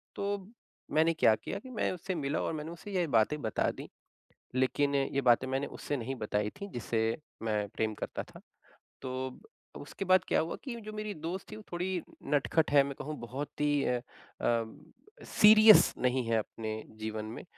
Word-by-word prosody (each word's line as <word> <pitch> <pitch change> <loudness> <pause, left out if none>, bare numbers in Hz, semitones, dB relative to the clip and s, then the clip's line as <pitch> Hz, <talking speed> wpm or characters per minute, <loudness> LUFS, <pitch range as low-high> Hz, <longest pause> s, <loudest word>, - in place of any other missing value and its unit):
तो 200 0 -1 0.6
मैंने 165 +1 +5
क्या 115 -8 +5
किया 110 - -5
कि 260 - -12
मैं - - +1
उससे 185 +1 -4
मिला 145 -1 -1
और - - -1
मैंने 160 +2 -6
उसे 170 +4 -9
ये 175 -2 +2
बातें 145 +7 +3
बता 110 -4 0
दी, - - -9 0.7
लेकिन 140 +2 +2
ये 140 0 +1
बातें 130 +2 +2
मैंने 135 +2 -1
उससे 145 - -2
नहीं 130 +2 -4
बताई 105 0 0
थी, 200 - -8
जिसे 115 -1 -1 0.4
मैं 105 -2 0
प्रेम 110 +2 -1
करता - - -4
था। - - -14 0.6
तो 130 0 -3 0.5
अब - - -7
उसके 195 - -6
बाद 185 0 +5
क्या - - +3
हुआ 160 +1 -3
कि 260 -4 -5
जो 215 - -7
मेरी 215 -1 -4
दोस्त 170 +5 -6
थी, - - -6
वो 215 - -10
थोड़ी 180 +1 -1 0.3
नटखट 145 +2 +2
है। 140 -1 +7
मैं 140 0 -5
कहूँ, 155 +2 -4
बहुत 130 +6 -6
ही 145 -1 +2
अ, 125 -1 0 0.4
अम, 115 -1 0 0.5
सीरियस 215 0 +8
नहीं 125 0 +1
है 115 -1 +2
अपने 110 0 -4 0.3
जीवन 110 0 -4
में। - - -8
145 Hz, 190 wpm, -31 LUFS, 120-180 Hz, 0.7 s, सीरियस